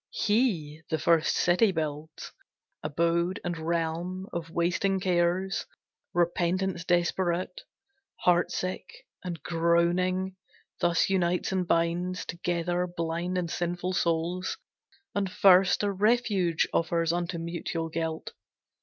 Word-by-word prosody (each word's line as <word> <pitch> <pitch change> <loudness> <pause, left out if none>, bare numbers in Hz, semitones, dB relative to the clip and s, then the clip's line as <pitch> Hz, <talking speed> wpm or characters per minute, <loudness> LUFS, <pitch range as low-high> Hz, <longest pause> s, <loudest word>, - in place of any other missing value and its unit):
He 190 - 0
the 160 - +1
first 160 +1 +3
city 180 +4 +3
builds, 155 -2 -4 0.5
abode 170 +4 0
and 175 -1 -1
realm 170 +3 -2
Of 170 -2 -4
wasting 180 +3 +1
cares; 180 +1 0 0.4
repentance 175 +1 0
desperate, 175 - 0 0.6
Heart 175 0 +3
sick, 185 0 -5 0.2
and 170 -5 -5
groaning, 175 +3 +1 0.4
thus 175 +2 +2
unites 180 -1 +1
and 185 -2 0
binds 170 +2 0
Together 175 +1 -1
blind 175 +1 -2
and 170 -2 -2
sinful 175 +1 -2
souls, 170 +2 0 0.6
and 195 -2 -1
first 195 -1 +5
A 205 - +1
refuge 200 -5 +2
offers 165 0 +1
unto 175 0 -2
mutual 165 0 -3
guilt. 160 0 -3
175 Hz, 110 wpm, -28 LUFS, 170-185 Hz, 0.6 s, first